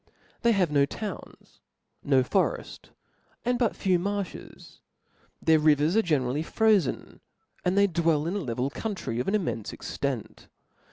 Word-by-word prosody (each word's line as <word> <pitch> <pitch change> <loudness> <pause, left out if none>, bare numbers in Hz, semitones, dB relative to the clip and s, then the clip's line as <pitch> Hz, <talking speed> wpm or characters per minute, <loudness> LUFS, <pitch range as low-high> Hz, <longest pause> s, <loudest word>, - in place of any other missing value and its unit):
They 235 -1 +4
have 185 -6 +1
no 140 -1 +3
towns, 210 +1 -8 0.4
no 135 -2 +3
foreftsy 185 +9 -1 0.6
and 245 0 +1
but 235 -4 +1
few 185 -2 +1
marlhes; 200 0 -5 0.6
their 160 -1 +4
rivers 150 +3 +3
are 225 - +5
generally 145 - 0
frozen, 210 - +1 0.4
and 180 +2 +1
they 200 - +6
dwell 165 -4 +1
rn 175 +4 -2
a - - 0
level 125 -3 -2
country 165 - -4
of 125 - -2
an 195 - +2
immcnfe 160 - -2
extent. - - -5
170 Hz, 145 wpm, -27 LUFS, 145-200 Hz, 0.6 s, they